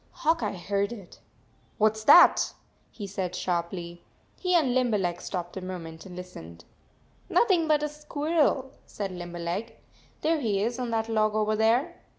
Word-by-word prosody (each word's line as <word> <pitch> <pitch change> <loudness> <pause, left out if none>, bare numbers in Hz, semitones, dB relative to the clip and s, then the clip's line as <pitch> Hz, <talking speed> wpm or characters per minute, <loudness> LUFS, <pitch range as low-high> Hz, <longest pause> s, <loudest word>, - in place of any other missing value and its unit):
Hawk 325 +1 +3
Eye 195 - -2
heard 200 +4 -1
it. 200 -7 -10 0.3
" - - -36
What 215 0 +4
s 220 0 -8
that?" 350 - +7 0.3
he 210 - -8
said 190 -2 -4
sharply. 175 -1 -3 0.4
He 365 -1 +1
and 285 -8 +3
Limberleg 210 -9 +1
stopped 175 -2 -5
a - - -4
moment 175 -2 -7
and 180 - -10
lis 180 0 -8
tened. 85 0 -11 0.7
"Nothing 360 -8 +3
but 300 -1 +3
a - - +1
squirrel," 300 -2 0 0.2
said 200 -2 -5
Limber 175 -1 -7
leg. 175 +7 -4 0.5
"There 320 0 +2
he 205 -6 0
is 240 +3 -2
on 250 -1 -2
that 225 -1 -1
log 215 -1 +1
over 215 0 +1
there." 240 +10 +2
215 Hz, 170 wpm, -27 LUFS, 180-260 Hz, 0.7 s, that